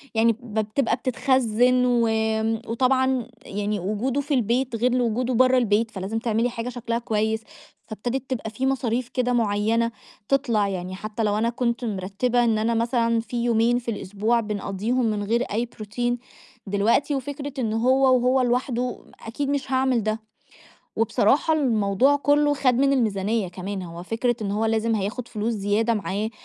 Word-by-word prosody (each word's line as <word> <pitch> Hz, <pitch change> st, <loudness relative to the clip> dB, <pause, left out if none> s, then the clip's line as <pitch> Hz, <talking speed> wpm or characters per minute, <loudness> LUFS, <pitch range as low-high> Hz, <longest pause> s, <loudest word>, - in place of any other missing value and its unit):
يعني 230 Hz, +1 st, +4 dB
ب 220 Hz, -3 st, -2 dB
تبقى 260 Hz, -4 st, +2 dB
بتتخزّن، 250 Hz, -1 st, +2 dB
وآمم، 220 Hz, -2 st, +1 dB
وطبعًا 260 Hz, +1 st, +1 dB, 0.2 s
يعني 205 Hz, 0 st, -2 dB
وجُوده 215 Hz, +9 st, -1 dB
في 290 Hz, +1 st, -3 dB
البيت 245 Hz, 0 st, +1 dB
غير 245 Hz, +2 st, +1 dB
لوجودُه 245 Hz, +1 st, 0 dB
برّا 255 Hz, +2 st, +4 dB
البيت، 225 Hz, -1 st, +2 dB
فلازم 200 Hz, +2 st, -3 dB
تعملي 230 Hz, +1 st, 0 dB
حاجة 235 Hz, 0 st, -4 dB
شكلها 235 Hz, -1 st, -3 dB
كويس، 220 Hz, -1 st, -1 dB, 0.4 s
فابتدت 245 Hz, +5 st, -4 dB
تبقى 230 Hz, -4 st, -3 dB
فيه 240 Hz, +5 st, -3 dB
مصاريف 250 Hz, -2 st, 0 dB
كده 250 Hz, -1 st, 0 dB
مُعيّنة 225 Hz, +1 st, +1 dB, 0.4 s
تِطلَع، 240 Hz, -7 st, +2 dB
يعني 185 Hz, -1 st, -4 dB
حتى 215 Hz, +3 st, -4 dB
لو 210 Hz, 0 st, +1 dB
أنا 230 Hz, +2 st, +1 dB
كنت 240 Hz, 0 st, -1 dB
مِرتّبة 210 Hz, +4 st, 0 dB
إن 225 Hz, -2 st, +2 dB
أنا 225 Hz, +2 st, +1 dB
مثلًا 230 Hz, 0 st, +1 dB
فيه 235 Hz, +1 st, -3 dB
يومين 235 Hz, +1 st, +3 dB
في 235 Hz, -1 st, -4 dB
الأسبوع 210 Hz, +3 st, 0 dB
بنقضّيهم 210 Hz, +3 st, -1 dB
من 210 Hz, -2 st, -1 dB
غير 235 Hz, +4 st, +1 dB
أي 230 Hz, +2 st, -2 dB
بروتين، 240 Hz, +2 st, -3 dB, 0.5 s
دلوقتي 220 Hz, +9 st, +2 dB
وفكرة 280 Hz, +1 st, -5 dB
إن 220 Hz, -3 st, -1 dB
هو 260 Hz, +3 st, +4 dB
وهو 250 Hz, +2 st, +2 dB
لوحده 250 Hz, 0 st, -1 dB, 0.2 s
أكيد 270 Hz, +5 st, -3 dB
مش 280 Hz, -1 st, -2 dB
هاعمل 260 Hz, -3 st, +2 dB
ده. 215 Hz, +1 st, -2 dB, 0.8 s
وبصراحة 225 Hz, +8 st, +2 dB
الموضوع 245 Hz, -1 st, +2 dB
كلّه 290 Hz, +1 st, +3 dB
خَد 265 Hz, -3 st, +2 dB
من 275 Hz, +3 st, +3 dB
الميزانية 215 Hz, -4 st, 0 dB
كمان، 190 Hz, +2 st, -5 dB
هو 170 Hz, -1 st, -8 dB
فكرة 230 Hz, +5 st, -1 dB
إن 200 Hz, -, -2 dB
هو 210 Hz, +2 st, 0 dB
لازم 225 Hz, 0 st, +1 dB
هياخد 220 Hz, +4 st, -3 dB
فلوس 220 Hz, +1 st, -2 dB
زيادة 210 Hz, +3 st, +1 dB
معاه 210 Hz, +1 st, -2 dB
230 Hz, 160 wpm, -24 LUFS, 215-250 Hz, 0.8 s, يعني